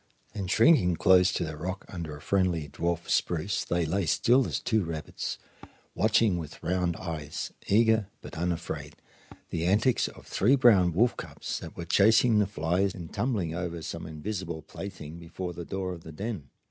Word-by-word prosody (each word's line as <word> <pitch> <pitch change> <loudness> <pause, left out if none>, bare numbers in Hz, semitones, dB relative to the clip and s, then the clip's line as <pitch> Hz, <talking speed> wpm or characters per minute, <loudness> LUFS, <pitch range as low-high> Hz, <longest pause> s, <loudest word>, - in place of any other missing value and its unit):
And 95 -3 -4
shrinking 110 - +5
close 90 +2 +5
to - - 0
the 80 -2 -4
rock 90 +5 -5
under 80 -5 -6
a - - -14
friendly 90 -5 +1
dwarf 85 +3 -2
spruce 90 +5 0
they 85 -1 0
lay 90 +2 0
still 125 - +4
as - - -2
two 110 -4 +1
rabbits, 80 -3 -4 0.6
watching 100 -6 +3
with 80 -1 -9
round 90 0 0
eyes, 80 -4 -5
eager 110 0 +4
but - - -10
unafraid, 85 0 -3 0.6
the 85 0 -1
antics 110 +7 +3
of - - -12
three 120 +8 +3
brown 105 -9 +5
wolf 115 +9 +3
cubs - - -5
that - - -10
were 85 - -5
chasing 110 +5 +5
the 105 - +3
flies 90 +2 0
and 85 -3 -9
tumbling 105 -10 -1
over 85 -1 -4
some - - -5
invisible 85 0 -5
plaything 85 -5 -8
before 90 +1 -6
the 85 0 -7
door 95 0 -3
of 85 - -9
the 80 - -10
den. 95 - -5
90 Hz, 170 wpm, -28 LUFS, 80-100 Hz, 0.6 s, shrinking